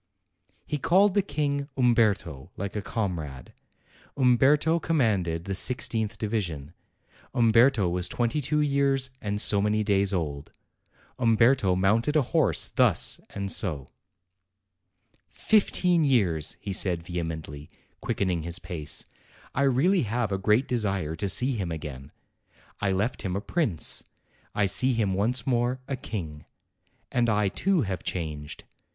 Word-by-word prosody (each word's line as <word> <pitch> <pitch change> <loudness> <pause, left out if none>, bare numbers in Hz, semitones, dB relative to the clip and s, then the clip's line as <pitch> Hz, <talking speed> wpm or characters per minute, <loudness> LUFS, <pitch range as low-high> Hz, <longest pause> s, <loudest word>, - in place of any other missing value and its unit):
He 150 - -3
called 185 +6 +4
the 200 - +3
King 145 -4 -2
"Umberto," 105 - +1
like 100 +2 -5
a 105 - -2
comrade. 85 - -4 0.6
Umberto 140 +6 +3
commanded 100 - 0
the 100 - -4
i6th 110 0 -1
division; 90 -9 -3 0.6
Umberto 115 -2 +4
was 90 +1 -2
twenty 120 +5 -1
two 150 +3 +1
years 140 -2 +1
and 105 0 -3
so 100 -1 +3
many 105 +1 +1
days 100 -1 +1
old; 75 -6 -3 0.7
Umberto 115 -4 +3
mounted 110 +10 +1
a 150 - +4
horse 130 - +2
thus - - +2
and 100 -1 -3
o. 75 -9 -4 1.4
"Fifteen 180 -5 +2
years!" 95 - +1
he 100 -2 -5
said 90 -3 +1
vehemently, 80 -4 -6 0.3
quickening 90 -4 -1
his 85 +2 -2
pace. 80 -7 -6 0.5
"I - - -1
really 140 +8 +3
have 115 -1 -2
a 95 - -1
great 105 +6 +2
desire 100 -9 -1
to 100 +4 -2
see 125 +7 +3
him 95 -5 -3
again. 75 -4 -7 0.7
I 100 -2 0
left 105 +6 -1
him 95 -3 -3
a - - 0
prince; 110 - -1 0.5
I 105 - +2
see 125 +7 +2
him 105 -5 0
once 115 +6 0
more, 125 0 0
a 135 - -2
king. 80 - -7 0.7
And 120 -1 +1
I, 105 -2 +2
too, 180 - +1
have 95 -3 -4
changed. 75 -4 -5
105 Hz, 135 wpm, -26 LUFS, 90-130 Hz, 1.4 s, called